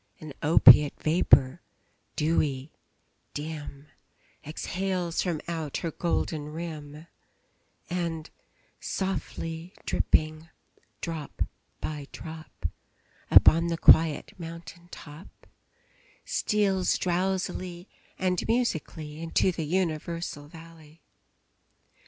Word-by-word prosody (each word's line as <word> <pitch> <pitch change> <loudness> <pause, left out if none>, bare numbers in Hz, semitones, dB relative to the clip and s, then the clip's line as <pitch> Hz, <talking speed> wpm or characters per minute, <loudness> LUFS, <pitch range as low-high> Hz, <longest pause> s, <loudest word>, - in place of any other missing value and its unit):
An 155 -2 -9
opiate 145 -2 +7
vapor, 155 -2 +4 0.5
dewy, 150 -3 0 0.6
dim, 145 -2 -6 0.6
Exhales 180 +2 -2
from 175 -4 -1
out 160 -4 -3
her 165 - -3
golden 160 -2 -1
rim, 155 -1 -7 0.8
And, 170 -3 -3 0.5
softly 175 -3 -4
dripping, 155 +1 +1 0.5
drop 160 -4 -3 0.4
by 150 -2 -4
drop, 160 -1 -10 0.6
Upon 165 +1 +7
the 170 -1 -1
quiet 160 -2 +5
mountain 170 +1 -9
top, 155 0 -13 0.8
Steals 195 -3 +1
drowsily 185 0 -2 0.3
and 185 -1 0
musically 160 -9 -1
Into 165 +3 +2
the 165 -2 -4
universal 165 -3 -2
valley. 160 -1 -15
165 Hz, 80 wpm, -28 LUFS, 155-175 Hz, 0.8 s, opiate